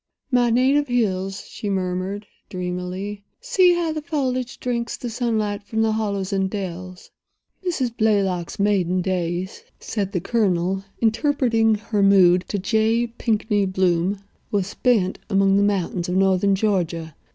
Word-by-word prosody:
"My 245 Hz, -1 st, +3 dB
native 265 Hz, +5 st, +3 dB
hills!" 195 Hz, -6 st, -1 dB
she 205 Hz, -, -5 dB
murmured, 190 Hz, +2 st, -2 dB, 0.2 s
dreamily. 180 Hz, +3 st, -4 dB, 0.2 s
"See 370 Hz, -7 st, +4 dB
how 340 Hz, -2 st, 0 dB
the 310 Hz, -1 st, -3 dB
foliage 260 Hz, -6 st, -2 dB
drinks 235 Hz, -2 st, -2 dB
the 240 Hz, -, -5 dB
sunlight 220 Hz, -4 st, -1 dB
from 220 Hz, +2 st, -1 dB
the 220 Hz, -, +2 dB
hollows 200 Hz, -3 st, -2 dB
and 190 Hz, -1 st, +1 dB
dells." 185 Hz, -2 st, -6 dB, 0.5 s
"Mrs. 265 Hz, -10 st, -1 dB
Blaylock's 195 Hz, -6 st, 0 dB
maiden 185 Hz, -3 st, +1 dB
days," 180 Hz, 0 st, -2 dB, 0.2 s
said 200 Hz, -3 st, -3 dB
the 185 Hz, -, -1 dB
Colonel, 190 Hz, -2 st, 0 dB, 0.2 s
interpreting 230 Hz, -1 st, +2 dB
her 210 Hz, 0 st, -2 dB
mood 185 Hz, -2 st, +5 dB
to 205 Hz, -, -2 dB
J. 220 Hz, +4 st, +1 dB
Pinkney 210 Hz, -3 st, +1 dB
Bloom, 185 Hz, 0 st, +1 dB, 0.3 s
"were 200 Hz, -2 st, +1 dB
spent 200 Hz, -1 st, 0 dB
among 195 Hz, -1 st, +3 dB
the -, -, +3 dB
mountains 185 Hz, -3 st, 0 dB
of 180 Hz, -, -1 dB
northern 195 Hz, +1 st, +3 dB
Georgia. 175 Hz, -6 st, -1 dB
200 Hz, 140 wpm, -22 LUFS, 185-230 Hz, 0.5 s, mood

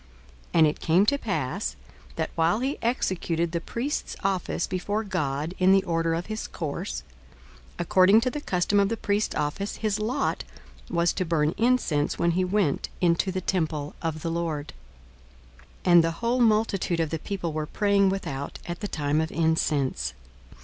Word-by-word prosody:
42:001:008 -, -, -28 dB
And 160 Hz, -2 st, +7 dB
it 150 Hz, -, -2 dB
came 175 Hz, +5 st, +3 dB
to 280 Hz, +6 st, +3 dB
pass, 190 Hz, -, -2 dB, 0.4 s
that -, -, -2 dB
while 170 Hz, +5 st, +2 dB
he 270 Hz, +3 st, -1 dB
executed 170 Hz, -8 st, 0 dB
the 170 Hz, -1 st, -2 dB
priest's 255 Hz, -, -3 dB
office 190 Hz, -3 st, 0 dB
before 205 Hz, +4 st, -2 dB
God 155 Hz, -5 st, -2 dB
in 185 Hz, +1 st, +5 dB
the 195 Hz, -1 st, +4 dB
order 165 Hz, -1 st, 0 dB
of 170 Hz, +2 st, -3 dB
his 215 Hz, +1 st, -4 dB
course, 65 Hz, -, -4 dB, 0.7 s
42:001:009 -, -, -26 dB
According 185 Hz, +5 st, +5 dB
to 255 Hz, -, +1 dB
the 295 Hz, -, -4 dB
custom 190 Hz, -2 st, +1 dB
of 200 Hz, 0 st, +3 dB
the 230 Hz, -, -2 dB
priest's 205 Hz, 0 st, 0 dB
office, 150 Hz, +8 st, -2 dB
his 215 Hz, -1 st, -1 dB
lot 245 Hz, +6 st, -1 dB, 0.5 s
was 170 Hz, 0 st, +2 dB
to 185 Hz, -, -1 dB
burn 160 Hz, -2 st, +1 dB
incense 225 Hz, -12 st, +1 dB
when 170 Hz, 0 st, +2 dB
he 185 Hz, +2 st, +1 dB
went 185 Hz, -5 st, 0 dB
into 175 Hz, +2 st, +2 dB
the 185 Hz, 0 st, -2 dB
temple 155 Hz, -5 st, -1 dB
of 160 Hz, -2 st, -3 dB
the 165 Hz, -, -1 dB
Lord. 165 Hz, -3 st, -3 dB, 1.1 s
42:001:010 180 Hz, -, +3 dB
And 170 Hz, -1 st, +8 dB
the 165 Hz, -, +2 dB
whole 235 Hz, +7 st, 0 dB
multitude 215 Hz, -6 st, +2 dB
of 160 Hz, -2 st, 0 dB
the 160 Hz, -, -2 dB
people 175 Hz, -3 st, -4 dB
were 155 Hz, 0 st, -2 dB
praying 200 Hz, +1 st, +3 dB
without 145 Hz, -8 st, -4 dB
at 175 Hz, 0 st, -5 dB
the 205 Hz, -, -3 dB
time 150 Hz, -3 st, 0 dB
of 160 Hz, -, -3 dB
incense. 155 Hz, -, 0 dB
175 Hz, 175 wpm, -26 LUFS, 160-205 Hz, 1.1 s, And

